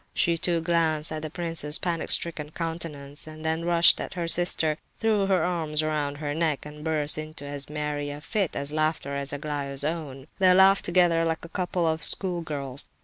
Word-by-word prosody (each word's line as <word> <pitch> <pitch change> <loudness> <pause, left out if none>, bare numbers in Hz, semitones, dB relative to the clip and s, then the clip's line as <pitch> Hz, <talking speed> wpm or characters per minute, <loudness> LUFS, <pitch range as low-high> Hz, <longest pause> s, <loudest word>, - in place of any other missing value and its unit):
She, 170 - +3
too, 170 0 0
glanced 160 -2 +2
at 155 0 -4
the 155 - -5
prince's 165 -2 +1
panic 170 -2 -3
stricken 160 -3 +1
countenance, 155 -4 -4
then 160 +1 -4
rushed 170 0 +5
at - - -6
her 170 -2 -2
sister, 165 -2 +3 0.2
threw 215 -3 +1
her 185 -4 +2
arms 160 -4 -1
round 150 -2 -2
her 145 -1 -3
neck, 155 -3 -1
and 150 0 -10
burst 155 -1 +1
into 155 -1 -8
as 140 0 -4
merry 150 -1 -3
a 145 0 -6
fit 190 +3 -2
of 140 +1 -1
laughter 155 -2 -1
as 140 0 -3
Aglaya's 145 -2 -4
own. 145 -4 -4
They 185 -1 +5
laughed 195 +1 +5
together 175 -2 +3
like 165 0 -2
a - - -11
couple 180 -1 -2
of 160 0 -1
school 180 -1 +1
girls. 140 -4 -3
155 Hz, 190 wpm, -26 LUFS, 150-170 Hz, 0.2 s, rushed